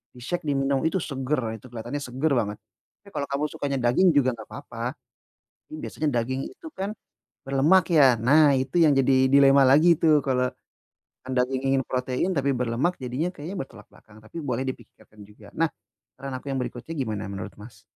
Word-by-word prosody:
di-shake, 155 +9 -4
diminum. 135 -1 +1
Itu 190 +4 0
seger. 130 -5 -2
Itu 125 - -14
kelihatannya 120 +4 -5
seger 135 +5 -1
banget, 105 -4 -1 0.5
Tapi 200 - -15
kalau 140 -1 -2
kamu 140 +1 -1
sukanya 140 -1 -3
daging 185 +8 +4
juga 130 -3 +4
nggak 110 -2 -11
papa. 120 -3 -5 0.8
Mmm, 155 - -6
biasanya 155 - -2
daging 130 +3 -3
itu 325 - -12
kan 195 +2 -4 0.5
berlemak, 145 +7 +4
ya? 135 -6 +6
Nah, 145 +4 +5
itu 130 +5 -2
yang 155 -3 +5
jadi 130 0 +4
dilema 140 0 +6
lagi 155 +6 +6
itu. 155 -2 +4
Kalau 125 -1 +1 0.8
anda 130 -1 +2
ingin 135 0 0
protein 130 +7 -1
tapi 140 -1 +1
berlemak 125 +8 0
jadinya 130 +7 -2
kayaknya 165 +7 -7
bertolak 135 - -9
belakang 110 0 -18
tapi 110 +10 -9
boleh 130 -2 -2
dipikirkan 120 -4 -10
juga. 105 0 -16
Nah, 165 - +2 0.5
saran 135 -1 -6
aku 140 - -16
yang 135 - -1
berikutnya 125 +5 -6
gimana 110 -7 -3
menurut, 100 0 -6
Mas? 105 0 -13
135 Hz, 175 wpm, -25 LUFS, 125-145 Hz, 0.8 s, ya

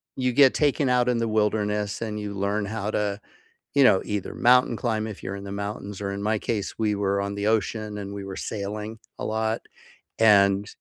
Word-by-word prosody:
you 125 -1 0
get 135 +1 +6
taken 145 -2 +2
out 125 0 +3
in 125 - +2
the 115 0 0
wilderness, 105 -1 0
and 105 -2 -3
you 105 -1 -5
learn 100 +1 -1
how 105 0 -3
to, 105 -1 -1 0.6
you 140 - +6
know, 105 -7 +5
either 105 -2 -3
mountain 125 0 +4
climb, 110 -2 -1
if 105 -3 -8
you're 95 - -5
in 100 - -8
the 100 - -7
mountains, 100 0 -5
or 100 -1 -2
in 100 0 -4
my 105 0 +1
case, 105 -2 -3
we 105 -2 +1
were 100 0 0
on 100 0 -3
the 100 +1 -1
ocean, 110 -1 0
and 100 0 -6
we 100 -1 -6
were 95 -1 -6
sailing, 105 +2 -5 0.2
a - - -3
lot, 110 +1 -1 0.6
and 100 -2 +5
105 Hz, 210 wpm, -25 LUFS, 100-110 Hz, 0.6 s, get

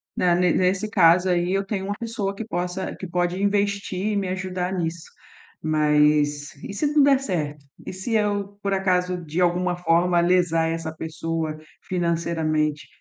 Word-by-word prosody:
Na 175 -1 +3
ne 180 0 +3
nesse 190 +3 +1
caso 180 -2 +5
aí 175 +1 +1
eu 195 0 0
tenho 195 -1 -3
uma 205 - -2
pessoa 220 -4 -3
que 225 - -5
possa 180 -2 -3
que 190 - -7
pode 175 +2 -1
investir 200 -1 0
e - - -1
me 195 - -1
ajudar 185 0 -3
nisso. 170 -2 -3 0.6
Mas 150 -1 +2
e - - -6
se 290 +8 0
não 295 -1 +4
der 275 -1 +5
certo? 150 - -3 0.2
E - - -6
se 190 +5 -4
eu, 205 -1 -1
por 200 0 0
acaso, 180 -1 +1
de 160 +3 -3
alguma 180 0 +1
forma 175 0 +2
lesar 170 -2 +2
essa 165 -1 -3
pessoa 160 0 -3 0.3
financeiramente? 165 -4 -1
180 Hz, 165 wpm, -23 LUFS, 165-195 Hz, 0.6 s, caso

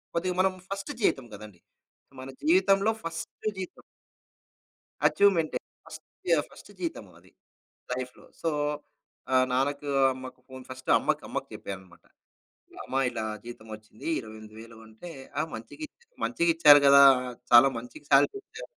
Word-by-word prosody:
కొద్దిగా 180 +2 0
మనం 190 0 +3 0.2
ఫస్ట్ 195 +7 -5
జీతం 135 -10 +1
కదండీ. 105 -3 -11 0.6
మన 130 - -8
జీవితంలో 220 - +3
ఫస్ట్ 165 +5 -7
జీతం. 185 -1 -7 1.3
అచీవ్మెంటే 190 -6 +2 0.3
ఫస్ట్ 155 -1 -11 0.5
ఫస్ట్ - - -15
జీతం 165 -10 -4
అది. - - -23 0.6
లైఫ్‌లో 125 0 -6 0.2
సో, 165 - 0 0.8
ఆహ్, 130 0 +5
నాన్నకు, 140 +3 -1 0.2
అమ్మకు 130 0 -10
ఫోన్ 130 0 -10
ఫస్ట్ 130 0 -9
అమ్మకు - - -1
అమ్మకు - - -4
చెప్పాననమాట. 95 -2 -9 0.8
అమ్మా 135 - -2
ఇలా 115 -2 -4 0.2
జీతం 120 -2 -10
వచ్చింది 110 +3 -12
28 110 -2 -11
వేలు 115 0 -13
అంటే, 110 +11 -11 0.3
ఆ - - +3
మంచిగిచ్ 300 - -10 0.2
మంచిగిచ్చారు 165 - +5
గదా! 140 0 +8 0.5
చాలా 120 +3 +8
మంచి 125 +5 -9
సాలరీ 145 - +4
ఇచ్చారు. - - -11
135 Hz, 125 wpm, -27 LUFS, 115-170 Hz, 1.3 s, గదా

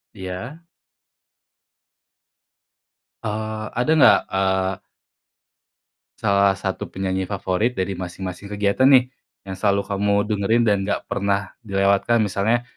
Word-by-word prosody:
Iya. 100 - -7 2.6
Eee, 110 0 -4
ada 125 +6 +1
nggak, 105 -7 +7
eee 95 0 0 1.4
salah 100 -1 +3
satu 95 0 -4
penyanyi 95 0 -3
favorit 100 +4 -1
dari 95 +1 -2
masing-masing 95 +1 -6
kegiatan, 105 +5 +2
nih, 130 -2 +5 0.3
yang 95 -1 -6
selalu 100 0 +2
kamu 100 0 -1
dengerin 105 +2 +1
dan 105 -3 +3
nggak 105 - -1
pernah 100 0 -1
dilewatkan, 100 +2 +2
misalnya, 110 +4 0
100 Hz, 105 wpm, -22 LUFS, 95-110 Hz, 2.6 s, nggak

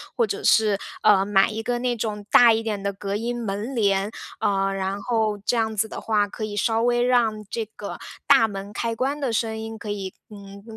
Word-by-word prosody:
或 470 - +3
者 420 0 -4
是， 210 -3 +4 0.2
呃， 200 -2 +5
买 195 0 +3
一 220 +1 -4
个 240 +2 -1
那 245 0 0
种 210 -2 -4
大 235 -2 +8
一 225 - -1
点 210 -3 -3
的 200 0 -2
隔 200 0 -4
音 240 +3 -3
门 210 +6 -4
帘， 200 -2 +2 0.3
呃， 195 -1 +1
然 195 +1 -3
后 220 -3 0
这 245 - +2
样 220 -1 0
子 220 +1 +1
的 - - -7
话， 210 -2 +1
可 215 - -7
以 210 -1 -4
稍 225 +2 +1
微 240 0 +2
让 230 -4 +2
这 230 -1 -3
个 205 - -7 0.3
大 225 - +6
门 200 -1 -7
开 230 +1 -2
关 275 +5 -1
的 270 -5 -1
声 220 0 -1
音， 220 0 -6
可 215 0 -8
以， 195 -2 -4 0.2
嗯， 200 -1 -12
215 Hz, 235 characters per minute, -24 LUFS, 200-230 Hz, 0.3 s, 大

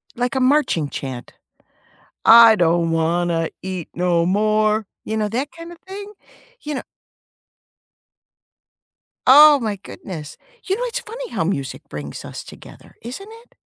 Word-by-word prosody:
like 245 +1 -2
a - - +1
marching 255 - +2
chant? 130 -4 -7 0.9
I 230 -1 +9
don't 170 -1 +2
wanna 165 0 0
eat 185 -3 -5
no 175 -1 +1
more. 215 +3 +1 0.2
You 220 - -3
know, 210 -1 -1
that 260 +7 -3
kind 335 +1 -11
of 345 - -12
thing? 400 +2 -9 0.5
You 300 -1 -5
know - - -3 2.5
Oh 290 +2 +8
my 215 -4 -3
goodness. 160 -6 -9 0.3
You 385 - 0
know, - - -3
it's 485 - -3
funny 475 +2 -8
how - - -1
music 140 -7 -4
brings 75 -1 -7
us - - -8
together, - - -15
isn't 275 - -8
it? - - -32
215 Hz, 140 wpm, -20 LUFS, -, 2.5 s, I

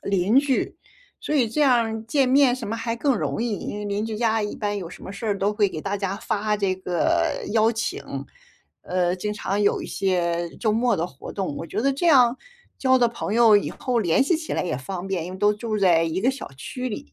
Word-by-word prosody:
邻 200 +5 +3
居， 275 -2 0 0.5
所 300 - -3
以 255 -6 +3
这 300 +7 -2
样 270 -4 +5
儿 220 0 -4
见 270 +3 +2
面 265 -2 +5
什 235 - -6
么 225 - -2
还 230 0 -2
更 275 +1 +1
容 - - -2
易， 225 -4 -2
因 - - -5
为 210 - -5
邻 205 +2 -2
居 220 - -4
家 225 -1 +1
一 205 - -3
般 205 -1 -2
有 175 -3 -6
什 - - -12
么 190 - -7
事 200 +3 -6
儿 205 - +1
都 200 +2 +1
会 210 -1 +2
给 160 -4 -6
大 200 +1 -2
家 195 -1 -2
发 215 -1 -1
这 195 -2 0
个 180 -2 0
邀 225 +1 +3
请， 230 0 -3 0.8
呃， 180 0 0
经 210 +3 -3
常 205 0 -2
有 200 - +2
一 - - -6
些 175 -3 0
周 220 -3 +2
末 235 0 +2
的 165 - -1
活 135 -6 -9
动。 190 -8 -3
我 165 - -5
觉 190 - -3
得 275 +1 +2
这 310 +6 -1
样， 255 -5 +5 0.4
交 260 -1 +4
的 245 -2 +4
朋 225 -2 -4
友 230 -3 +7
以 205 - 0
后 250 -2 -1
联 175 -2 +3
系 325 +5 +2
起 315 0 -6
来 - - 0
也 175 -8 -2
方 180 +8 -6
便， 185 -4 -2
因 180 - -7
为 185 - -8
都 205 +1 +4
住 215 +1 -3
在 170 -3 +4
一 165 +3 -2
个 255 +5 +3
小 265 - -7
区 250 - -5
里。 70 - -7
210 Hz, 265 characters per minute, -24 LUFS, 190-240 Hz, 0.8 s, 友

